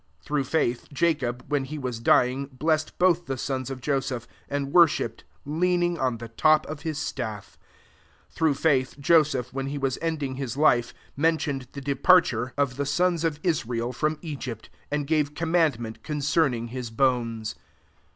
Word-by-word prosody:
£1 - - -36
Through 145 -2 0
faith, 125 -4 0
Jacob, 135 -5 0
when 145 -2 0
he 150 +3 -6
was 125 -5 -4
dy 115 - +5
ing, 135 +2 -4
blessed 155 +4 -1
both 175 -1 +3
the 135 -1 -2
sons 130 0 -3
of 130 -1 -6
Joseph; 135 -3 -2 0.2
and 140 -1 -2
worshipped, 170 -3 +3 0.2
lean 175 +4 +1
ing 175 -1 0
on 130 -3 0
the 115 +1 -7
top 155 +6 +3
of 150 -1 -7
his 160 -3 -3
sti^. 110 -7 -3
2£ 100 - -18 0.8
Through 160 -3 +2
faith, 135 -3 +1
Joseph, 140 -4 +3
when 135 0 -3
he 145 +1 -3
was 135 -2 -1
ending 150 -5 -2
his 135 -2 -4
life, 120 -5 +3 0.2
men 160 +3 +3
tioned 135 -5 -3
the 140 - -6
departure 135 -3 +3
of 140 -3 0
the 140 - 0
HEBREWS 140 - -3
XII. 180 - +2
S63 - - +6
ions 170 -2 -3
of 155 -2 -1
Ispiel 125 -8 -1
./rom 155 +4 -1
Egyfit: 130 - -6 0.2
and 145 -1 -1
^▼e 150 -2 +1
commandment 160 -10 0
concerning 140 -5 0
lis 125 -3 -4
bones. 115 -2 0
140 Hz, 180 wpm, -26 LUFS, 125-155 Hz, 0.8 s, S63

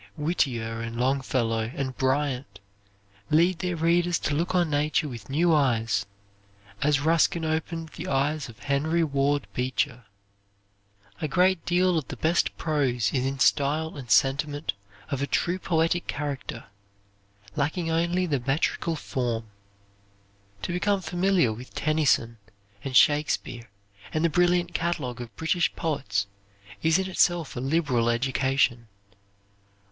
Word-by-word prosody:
Whittier 120 -8 -1
and 115 0 -5
Longfellow 125 -4 0
and 130 -2 -3
Bryant 130 -5 -1 0.7
lead 170 +3 +3
their 180 -1 -2
readers 170 +1 +2
to - - -2
look 170 +5 -1
on 175 -2 +3
nature 150 +2 +1
with 120 -4 -9
new 165 +5 +3
eyes, 115 -8 +1 0.7
as 145 -1 +2
Ruskin 165 +1 +2
opened 160 +1 -2
the - - -8
eyes 140 +1 0
of 115 - -12
Henry 150 +4 0
Ward 140 -3 +1
Beecher. 125 -2 -1 1.2
A 155 - 0
great 180 +3 +2
deal 180 -1 +3
of 150 - -9
the - - -7
best 165 +1 +1
prose 130 -8 0
is 130 -1 +1
in 135 0 -3
style 150 +4 +2
and 130 -5 -9
sentiment 145 +1 +2 0.4
of 140 -1 -1
a 140 - 0
true 175 +5 0
poetic 165 0 0
character, 145 -2 -4 0.9
lacking 165 +4 -1
only 170 +3 +1
the 145 -6 0
metrical 155 +3 0
form. 120 -7 -3 1.1
To 175 - -2
become 195 +2 +1
familiar 175 - +2
with 125 +4 -11
Tennyson 145 -7 +1 0.4
and 130 -2 +2
Shakespeare, 145 -6 +2 0.4
and 155 +1 0
the 165 - +2
brilliant 175 +1 +2
catalogue 150 -9 -2
of 115 -4 -9
British 175 +2 +1
poets 115 -11 -1 0.6
is 160 +1 +4
in 190 0 -1
itself 175 -3 +1
a - - -3
liberal 130 -4 +1
education. 130 -1 +1
145 Hz, 130 wpm, -26 LUFS, 130-165 Hz, 1.2 s, is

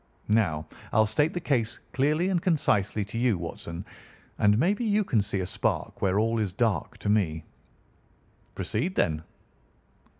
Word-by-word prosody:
Now, 80 -9 +2 0.3
I'll 110 - +4
state 145 +9 +1
the - - 0
case 120 -9 0 0.2
clearly 150 +7 +2
and 180 -3 +1
concisely 105 - +1
to 110 +3 -5
you, 120 -5 +2
Watson, 85 +1 -6 0.5
and 105 0 +4
maybe 200 - +2
you 210 -1 +2
can 115 - +2
see 100 -1 -2
a - - -2
spark - - -2
where 95 0 +2
all 115 +1 +2
is 105 -4 0
dark 105 -6 0
to - - -3
me." 85 -7 +1 1.1
"Proceed, 170 - -2
then." 80 -2 +1
110 Hz, 155 wpm, -27 LUFS, 95-150 Hz, 1.1 s, I'll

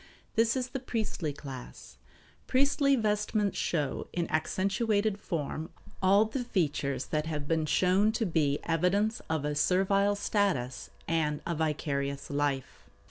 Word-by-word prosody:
This 230 +2 +3
is 255 -1 -2
the 270 - -4
priestly 220 - -2
class. 135 - -10 0.5
Priestly 275 +1 +3
vestments 210 -2 0
show, 150 -5 -1
in 175 -1 -1
accentuated 200 +5 +1
form, 160 -2 -3 0.3
all 200 +3 +5
the 245 +4 -3
features 145 - -1
that 155 0 0
have 150 -3 -3
been 160 -1 +1
shown 185 +6 +3
to 225 0 0
be 150 -5 +1
evidence 195 +7 +1
of 160 -2 0
a 150 - 0
servile 195 +6 +3
status 195 - 0 0.2
and 155 -3 +1
a 170 - -1
vicarious 140 -3 -2
life. 140 -2 -2
180 Hz, 135 wpm, -30 LUFS, 150-210 Hz, 0.5 s, all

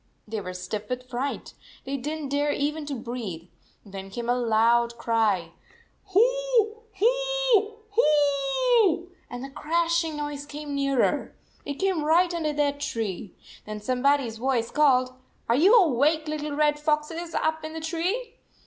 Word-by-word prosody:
They 215 0 -4
were 185 -1 -7
stiff 210 +3 -5
with 250 0 -4
fright. 255 +3 -4 0.3
They 270 +1 -3
did 295 +4 -3
n - - -7
t 280 - -2
dare 290 0 +1
even 295 +1 -2
to 285 - -3
breathe. 225 -9 -6 0.4
Then 195 -1 -8
came 235 +4 -5
a 245 - +3
loud 235 0 +2
cry, 215 -8 +1 0.6
"Hoo, 460 +1 +2 0.2
hoo, - - +2 0.2
hooooooo," 350 - +3 0.2
and 245 +1 -6
the 270 - -7
crashing 335 +1 0
noise 290 -1 -5
came 295 0 -6
nearer. 275 -2 0 0.3
It 285 - -4
came 375 -2 0
right 345 +3 +3
under 320 -3 -1
their 290 -1 +1
tree. 220 -9 -4 0.3
Then 215 0 -5
somebody 265 +5 +2
s 225 -1 -6
voice 240 -1 0
called, 255 -4 +3 0.3
"Are 235 - +3
you 370 - +6
awake, 310 - +2
little 300 -1 -3
red 295 0 +2
foxes, 310 +3 -1
up 315 0 0
in 315 0 -6
the 320 - -5
tree?" 355 +9 -3
290 Hz, 155 wpm, -26 LUFS, 245-335 Hz, 0.6 s, you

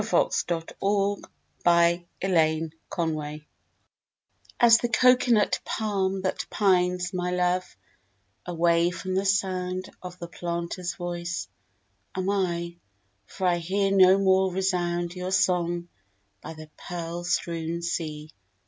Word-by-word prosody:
A - - -4
SINGHALESE 165 -1 0
LOVE 200 0 +1 1.0
LAMENT 160 -3 -1 1.2
As 235 -2 +7
the 240 - -1
cocoanut 245 -3 +4
palm 195 -3 -1
That 185 - -1
pines, 180 -2 +1
my 180 -1 -1
love, 180 - -1 0.7
Away 170 0 +2
from 180 +1 -5
the 190 +1 0
sound 185 -1 -1
Of 180 0 -8
the 170 -2 -7
planter's 170 +1 -4
voice, 175 - -4 0.7
Am 185 +1 0
I, 170 -3 -1 0.5
for 190 - -5
I 175 -1 +3
hear 195 +4 0
No 190 -1 +6
more 190 -1 +3
resound 175 -2 -1
Your 180 0 -5
song 175 -2 +1 0.5
by 160 - -8
the 155 0 -12
pearl 170 -1 -5
strewn 170 -1 -2
sea! 155 -3 -4
180 Hz, 110 wpm, -26 LUFS, 170-190 Hz, 1.2 s, As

